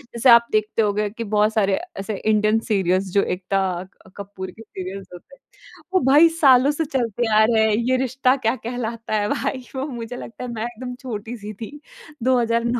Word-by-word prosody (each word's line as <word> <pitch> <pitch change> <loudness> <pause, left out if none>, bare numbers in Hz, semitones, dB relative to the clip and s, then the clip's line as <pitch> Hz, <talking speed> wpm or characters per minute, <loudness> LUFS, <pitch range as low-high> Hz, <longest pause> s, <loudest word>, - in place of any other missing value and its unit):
जैसे 240 +2 +3
आप 235 0 +7
देखते 215 +1 +1
होंगे 210 0 0
कि 230 +3 -6
बहुत 210 +1 +3
सारे 200 -3 +2 0.2
ऐसे 195 +1 -4
इंडियन 215 0 +2
सीरियल्स 190 -1 +1
जो 200 - +3
एकता 195 +1 -1 0.6
कपूर 195 -2 -7
के 225 - -15
सीरियल्स 190 -2 -8
होते 180 - -13
हैं, - - -32 0.5
वो 370 - +5
भाई 290 +5 +7
सालों 280 -4 +5
से 310 +2 -2
चलते 240 -4 -1
आ 215 - +6
रहे 220 -1 +3
हैं। 220 - +2 0.2
ये 260 - +3
रिश्ता 260 0 +1
क्या 225 +3 +2
कहलाता 230 -2 -4
है 205 0 -1
भाई, 260 -2 -2
वो 265 +1 -2
मुझे 240 -2 -6
लगता 235 - -9
है, 250 - -5
मैं 225 -2 -4
एकदम 245 +1 -6
छोटी-सी 220 -3 -6
थी, 235 +8 -9 0.4
2009 235 -1 +1
225 Hz, 190 wpm, -22 LUFS, 210-250 Hz, 0.6 s, आप